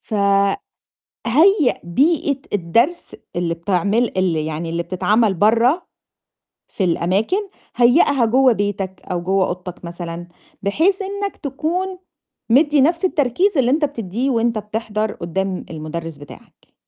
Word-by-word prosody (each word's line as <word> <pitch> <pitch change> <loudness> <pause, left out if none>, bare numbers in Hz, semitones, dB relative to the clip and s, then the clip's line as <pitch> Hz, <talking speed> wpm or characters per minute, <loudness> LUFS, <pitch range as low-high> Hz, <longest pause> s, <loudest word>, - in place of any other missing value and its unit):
فهيّأ 200 -2 +1 1.3
بيئة 280 - +1
الدرس 230 - +1 0.3
اللي 170 -1 0
بتعمل 200 +6 0
ال 185 -3 +1
يعني 155 +1 -3
اللي 170 +1 -1
بتتعمل 195 +4 +1
برّه 235 - +3 0.8
في 195 - -3
الأماكن، 185 - +1 0.4
هيّأها 250 +1 +4
جوّه 255 +2 +4
بيتك 200 -2 -3
أو 175 -1 -1
جوّه 190 +1 +1
أوضتك 180 0 -7
مثلًا 170 0 -7 0.3
بحيث 325 - +1
إنّك 400 +1 -4
تكون 350 +7 -3 0.5
مدّي 290 +4 +4
نَفْس 335 +6 +2
التركيز 330 - +1
اللي 255 -2 +3
أنت 300 +2 +2
بتدّيه 240 -2 -3
وأنت 230 -2 +1
بتحضر 215 0 -3
قُدّام 185 +2 -3
المُدرِّس 160 0 -6
بتاعك. 145 0 -15
210 Hz, 115 wpm, -20 LUFS, 180-275 Hz, 1.3 s, هيّأها